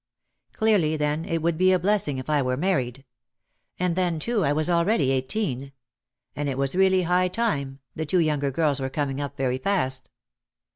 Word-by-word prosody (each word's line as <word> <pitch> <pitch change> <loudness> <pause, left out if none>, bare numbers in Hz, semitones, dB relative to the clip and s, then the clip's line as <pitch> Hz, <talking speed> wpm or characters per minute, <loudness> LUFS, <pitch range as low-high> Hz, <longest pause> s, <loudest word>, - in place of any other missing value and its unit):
Clearly, 195 -8 +2
then, 150 +2 -1
it 165 -1 -2
would 170 -1 0
be 185 0 +5
a 185 - +4
blessing 180 -6 +1
if 130 - -6
I 150 -2 +2
were 125 -1 -1
married. 135 -7 -1 0.7
And 180 -2 0
then, 180 -3 0
too, 215 +5 0
I 140 - +2
was 155 +1 +1
already 170 - +2
eighteen. 135 - -2 0.6
And 145 -1 -2
it 135 - -3
was 135 +3 0
really 190 -1 +3
high 180 +1 +2
time, 140 - -2
the 160 -1 -4
two 185 - +1
younger 150 -4 +1
girls 145 0 +1
were 130 0 -2
coming 140 0 -2
up 140 0 -5
very 130 -1 -1
fast. 135 -6 -1
155 Hz, 185 wpm, -25 LUFS, 135-180 Hz, 0.7 s, be